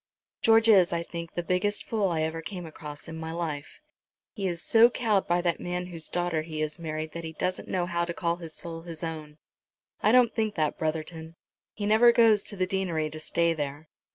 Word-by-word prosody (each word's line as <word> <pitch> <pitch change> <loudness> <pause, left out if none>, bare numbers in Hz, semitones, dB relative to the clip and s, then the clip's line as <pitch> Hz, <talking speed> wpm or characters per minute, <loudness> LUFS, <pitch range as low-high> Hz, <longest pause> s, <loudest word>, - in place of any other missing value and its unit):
"George 225 0 +5
is, 190 -5 +6
I 170 -1 -1
think, 170 0 -7
the 175 - -1
biggest 185 +4 0
fool 210 -4 0
I 160 -2 0
ever 160 +1 -2
came 180 0 -6
across 150 -1 -9
in 165 0 -7
my 160 0 -5
life. 160 - -5 0.5
He 200 -3 -2
is 170 -2 -2
so 230 +1 +6
cowed 220 -5 +1
by 175 +1 +2
that 170 -2 0
man 180 0 -3
whose 165 -1 -3
daughter 175 -2 0
he 155 -1 -5
has 155 +2 -3
married 155 -1 -4
that 170 - -6
he 160 0 -6
doesn't 180 +3 -2
know 180 -2 0
how 170 -1 -1
to 170 - -4
call 170 -1 0
his 165 -3 -9
soul 165 -2 -5
his 165 -1 -8
own." 155 -2 -6 0.6
"I 215 - +4
don't 245 -2 +5
think 220 -2 -1
that, 155 -2 0
Brotherton. 160 +1 -3 0.4
He 205 - -3
never 220 +3 +6
goes 225 -3 +5
to 205 - -4
the 185 -1 +1
deanery 175 -5 -1
to 155 - -6
stay 170 +2 +1
there." 145 0 -5
170 Hz, 215 wpm, -28 LUFS, 160-190 Hz, 0.6 s, is